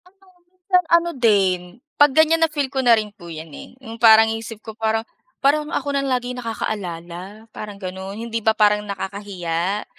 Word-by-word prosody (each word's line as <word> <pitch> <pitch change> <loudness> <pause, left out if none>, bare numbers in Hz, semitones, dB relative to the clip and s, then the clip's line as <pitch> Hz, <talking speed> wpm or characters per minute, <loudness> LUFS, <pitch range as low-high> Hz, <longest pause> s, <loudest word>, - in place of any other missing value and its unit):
Ano 370 +2 -24 0.3
minsan 365 0 0
ano 340 0 +4
din, 200 -7 +3 0.4
pag 290 -1 +7
ganyan 320 +1 +5
na 325 - +4
feel 290 -3 -2
ko 265 - 0
na 240 -3 +5
rin 210 -1 -4
po 175 -5 -13
yan, 160 -1 -8
eh, - - -11
yung 225 0 -9
parang 220 -1 +8
isip 225 0 -6
ko 220 - -6
parang 220 0 -1 0.4
parang 300 +2 +2
ako 285 - -2
lang 275 - -1
lagi 250 -1 -2
nakaka-alala 200 -3 -6
parang 210 -1 -8
ganon, 190 +1 -6
hindi 230 0 -4
ba 220 +1 +3
parang 210 -1 +4
nakakahiya? 195 -2 -3
220 Hz, 180 wpm, -21 LUFS, 195-265 Hz, 0.4 s, parang